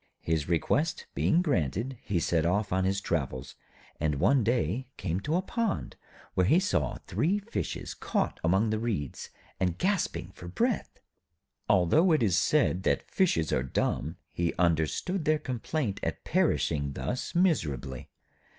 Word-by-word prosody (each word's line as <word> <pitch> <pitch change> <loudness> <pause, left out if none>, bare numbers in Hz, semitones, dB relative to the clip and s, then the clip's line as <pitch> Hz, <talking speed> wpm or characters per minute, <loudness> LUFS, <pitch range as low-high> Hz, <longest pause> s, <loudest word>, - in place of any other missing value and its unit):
His 80 -2 0
request 145 - +1
being 170 +2 +2
granted, 115 - 0
he 95 -4 -1
set 85 0 +1
off 100 +4 +1
on 95 0 +2
his 100 +1 0
travels, 65 -6 -2 0.5
and 75 -1 +1
one 130 - +3
day 120 - 0
came 90 0 -2
to 150 +11 -1
a 185 - +1
pond, 230 +1 -2 0.4
where 90 -1 +2
he 165 - +5
saw 195 - 0
three 180 +7 +1
Fishes 205 +3 -4
caught - - -1
among 95 +7 +3
the 110 - 0
reeds, 105 - -3 0.3
and 90 -2 0
gasping 155 - -1
for 90 -2 -10
breath. 90 - -1 0.7
Although 105 - +4
it 155 - +3
is 95 -6 +3
said 90 - +2
that - - 0
fishes 165 - +2
are 65 - +2
dumb, 70 +4 -1 0.2
he 85 -1 -1
understood 85 - +1
their 155 0 +3
complaint 130 -3 -3
at - - -3
perishing 70 -3 +1
thus 125 - -4
miserably. 75 - 0
95 Hz, 150 wpm, -29 LUFS, -, 0.7 s, he